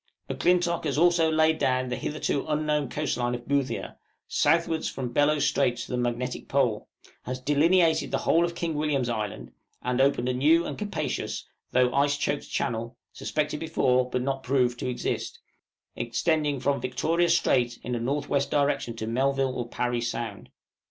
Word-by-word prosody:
M'Clintock 175 -2 +1
has 145 -2 -1
also 170 0 +4
laid 160 0 +3
down 130 0 +1
the 125 - -1
hitherto 145 -1 -2
unknown 150 -2 0
coast 150 -2 -2
line 120 0 0
of 120 0 -9
Boothia, 140 -2 -1 0.3
southwards 160 +1 +1
from 125 -2 -5
Bellot 145 +1 +3
Strait 120 -1 +2
to 120 - -6
the - - 0
Magnetic 120 0 -2
Pole, 125 -6 +1 0.4
has 130 0 -4
delineated 160 +4 +3
the - - 0
whole 170 - +3
of 170 0 -2
King 170 -1 -2
William's 145 -5 0
Island, 105 - -4 0.3
and 125 +1 +1
opened 135 -2 +2
a 125 - +1
new 155 +7 +4
and - - -4
capacious, 210 -1 -3 0.2
though 125 -1 +2
ice 145 +1 +2
choked 145 0 -2
channel, 115 +1 -2 0.2
suspected 150 -1 -2
before, 130 -6 +1
but 125 0 -1
not 135 0 -2
proved, 125 -2 +1
to 125 - -2
exist, 125 - -3 0.6
extending 145 +3 0
from 140 +2 0
Victoria 165 +7 +1
Strait 120 -1 +2
in 125 - -3
a 120 - -1
north 140 +5 -2
west 140 -1 0
direction 140 -5 0
to 110 - -4
Melville 135 +3 +1
or 120 -2 -4
Parry 120 -1 -1
Sound. 115 -3 -4
135 Hz, 170 wpm, -27 LUFS, 125-155 Hz, 0.6 s, also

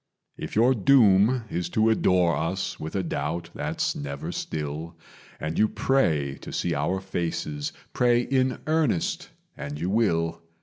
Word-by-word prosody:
"If - - -7
your 120 +5 +5
doom 115 0 +4
is 85 0 -2
to 110 +4 +3
adore 90 -5 +3
us 95 +3 -2
with 80 - -6
a 95 - 0
doubt 85 0 -3
that's - - -2
never 70 -1 -5
still, 80 +2 -5 0.4
And 80 +1 -3
you 110 - +5
pray 80 - +1
to - - -8
see - - -1
our 95 - 0
faces 85 -6 -3 0.2
pray 120 -1 +3
in 130 0 +1
earnest, 155 - 0 0.3
and 75 0 -6
you 90 +4 -1
will. 85 -7 +1
90 Hz, 145 wpm, -26 LUFS, 80-115 Hz, 0.4 s, your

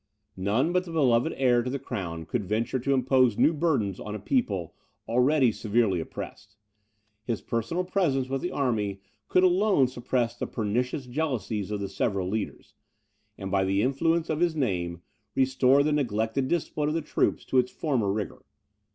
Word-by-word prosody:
None 105 - +1
but 180 0 +2
the 170 - -8
beloved 140 -2 +3
heir 125 -2 +3
to 125 - -3
the 140 - -2
crown 85 -11 -5
could 115 +5 -2
venture 110 +6 -1
to 140 +3 +1
impose 130 -3 +3
new 165 - +4
burdens 140 - 0
on 105 0 -5
a - - -5
people 100 - -1 0.3
already 125 +2 +3
severely 110 -4 +1
oppressed; 80 - -8 0.7
his 115 -3 -2
personal 115 - -2
presence 165 -9 0
with 135 +1 -2
the 175 - -2
army 110 - -1 0.3
could 185 - +3
alone 185 -4 +4
suppress 120 -1 -1
the - - -4
pernicious 125 +5 -2
jealousies 120 -7 -2
of 105 -1 -3
the 100 - -2
several 95 -1 -1
leaders, 105 +2 -4 0.6
and 95 -1 -6
by 95 -1 +2
the 100 +2 +1
influence 165 +6 +1
of 155 - -1
his 170 -2 +2
name, 90 - -2 0.3
restore 130 +1 +4
the 150 - +1
neglected 120 -1 0
discipline 150 -2 -1
of 155 - -1
the 165 - -1
troops - - 0
to 130 - +3
its 125 0 +1
former 125 -10 0
rigour. 105 0 -4
125 Hz, 170 wpm, -27 LUFS, 105-145 Hz, 0.7 s, new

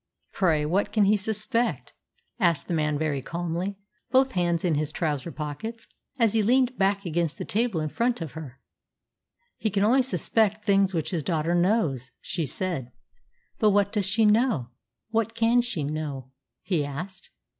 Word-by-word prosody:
"Pray, 160 -6 +2
what 185 +7 0
can 215 - +3
he 200 +2 +4
suspect?" 215 +3 0 0.5
asked 170 -6 +2
the 175 - -2
man 150 -2 +1
very 145 -3 -1
calmly, 175 +6 -3 0.3
both 260 +2 +4
hands 175 -3 0
in 170 - +2
his 150 0 -1
trouser 155 -1 -2
pockets, 160 +11 -6 0.3
as 230 -4 +3
he 225 - +3
leaned 250 +3 +3
back 200 -1 +1
against 170 -2 -1
the - - -5
table 220 -4 0
in 155 - -1
front 235 +9 0
of 165 -5 -5
her. 145 -5 -9 1.0
"He 220 - 0
can 200 0 +1
only 250 +6 +5
suspect 215 - +1
things 195 -2 +3
which 160 - -2
his 170 -4 -1
daughter 165 +1 0
knows," 175 - +1
she 170 -5 -3
said. 150 -7 -3 0.7
"But 215 - +5
what 200 0 +2
does 205 -3 0
she 220 +3 +2
know? 210 - +2 0.4
What 225 0 0
can 230 +1 +4
she 215 -11 -3
know?" 140 -3 -4 0.3
he 170 -6 0
asked. 165 +7 -7
185 Hz, 165 wpm, -26 LUFS, 155-220 Hz, 1.0 s, only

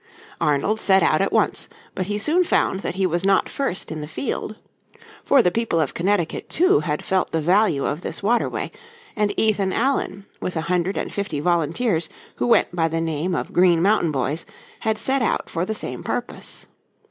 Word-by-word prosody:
Arnold 150 +9 +1
set 190 -2 +4
out - - +3
at - - +1
once, - - +1 0.2
but 185 - -3
he 205 0 -1
soon 310 - +2
found 190 - +1
that 185 - -4
he 190 0 +1
was 175 0 0
not 195 0 +3
first 270 -10 -2
in 155 -1 -4
the 150 - -6
field. 160 - -4 0.7
For 275 -3 +5
the 180 - +3
people 225 -5 0
of 150 -4 0
Connecticut, 180 -1 -1
too, 370 +4 +4
had 150 -3 -3
felt 190 -1 0
the 165 - 0
value 175 -3 +2
of 150 +4 -2
this - - -5
waterway 235 +4 0 0.4
and 210 -1 +1
Ethan 205 -3 +2
Allen 220 -5 -1
with 180 - -4
a 160 - 0
hundred 180 +3 0
and - - -3
fifty 200 -7 -2
volunteers 170 +2 +1 0.3
who - - 0
went 235 - +3
by 165 -2 +2
the 165 0 -2
name 165 +2 -1
of - - -4
Green 175 -2 +5
Mountain 190 -2 +3
Boys 140 +3 -1 0.4
had 220 -2 0
set 265 +4 +1
out 235 - -1
for 170 +1 -1
the 220 - -2
same - - -4
purpose. - - -5
185 Hz, 195 wpm, -22 LUFS, 165-215 Hz, 0.7 s, For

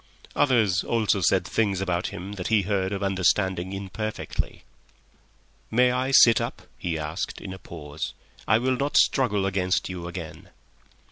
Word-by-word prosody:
Others 110 -9 +3
also 110 -4 +1
said 90 +1 +3
things 100 -2 0
about 90 -2 -1
him 95 +3 -7
that 95 -3 -5
he 110 -3 +3
heard 95 -1 -1
or 100 0 -3
understood 95 -1 +2
imperfectly. 100 +3 -4 1.1
"May 125 +2 +4
I 130 +1 0
sit 120 -4 +7
up?" - - -5 0.2
he 85 -2 -2
asked, 80 +3 -4
in 95 - -7
a 95 - -10
pause. 75 -4 -7 0.3
"I 110 - +5
will 130 +2 0
not 140 +2 0
struggle 105 -8 +3
against 95 -1 0
you 90 -2 -6
again." 85 - -8
95 Hz, 150 wpm, -25 LUFS, 90-110 Hz, 1.1 s, sit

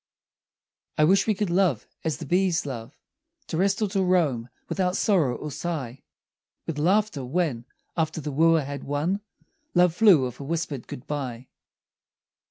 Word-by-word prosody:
I 155 - +4
wish 190 +8 +4
we 215 - +2
could 195 -2 -1
love 175 - +2 0.2
as 160 -2 -1
the - - -7
bees 180 -2 +1
love, 125 -2 -7 0.5
To - - -5
rest 195 +4 +2
or - - +2
to 195 0 0
roam 155 -11 +1 0.2
without 185 -1 0
sorrow 165 - +2
or 150 - -6
sigh; 135 -6 -4 0.6
With 150 -3 -4
laughter, 190 -2 +2
when, 130 -4 -1 0.3
after 160 -1 -1
the 150 -1 -4
wooer 165 +2 +4
had 140 0 -6
won, 155 +8 -1 0.5
Love 175 -1 +5
flew 180 - +6
with 125 -1 -6
a - - -6
whispered 150 -3 -3
good 125 - -8
bye. 130 -5 -5
160 Hz, 160 wpm, -26 LUFS, 135-185 Hz, 0.6 s, flew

